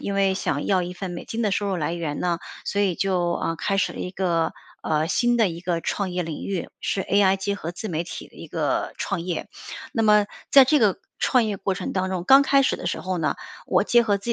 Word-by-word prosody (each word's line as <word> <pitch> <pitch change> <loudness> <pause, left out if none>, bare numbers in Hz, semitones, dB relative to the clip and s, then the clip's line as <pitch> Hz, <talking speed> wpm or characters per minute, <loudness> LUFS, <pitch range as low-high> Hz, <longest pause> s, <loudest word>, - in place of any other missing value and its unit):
因 200 - -3
为 195 -1 +2
想 145 -6 -2
要 190 -2 +2
一 180 +1 -5
份 180 0 -6
美 175 - -6
金 225 - -4
的 210 -4 +1
收 200 0 0
入 190 - 0
来 165 0 -1
源 160 -4 -3
呢， 175 -1 -1 0.2
所 200 - 0
以 185 -4 +1
就， 180 -3 +1
呃， 165 - -2
开 195 +4 -1
始 195 - +1
了 - - -7
一 180 - -4
个， 170 -4 0 0.3
呃， 155 0 +1
新 240 +7 +2
的 225 -4 +4
一 170 0 -6
个 175 -1 -1
创 195 +2 -2
业 180 -1 -2
领 160 -2 -5
域， 190 -4 -3
是 195 - -1
AI 195 -1 +3
结 200 +1 -2
合 170 -5 -5
自 180 +5 -7
媒 165 -5 -2
体 175 - -8
的 - - -23
一 - - -10
个 - - -1
创 195 -4 -2
业。 175 0 -3 0.5
那 225 - 0
么 210 -1 +5 0.2
在 275 -1 +9
这 295 +2 +3
个 205 -4 +3 0.2
创 250 -4 +3
业 210 -2 -2
过 195 0 -1
程 - - -4
当 190 0 -1
中， 180 -2 -2
刚 270 +4 +8
开 275 0 +4
始 270 - +2
的 180 - -3
时 - - -2
候 185 -1 -2
呢， 155 - 0 0.3
我 - - +2
结 240 0 +4
合 205 -3 +1
自 200 - -18
190 Hz, 280 characters per minute, -24 LUFS, 175-205 Hz, 0.5 s, 在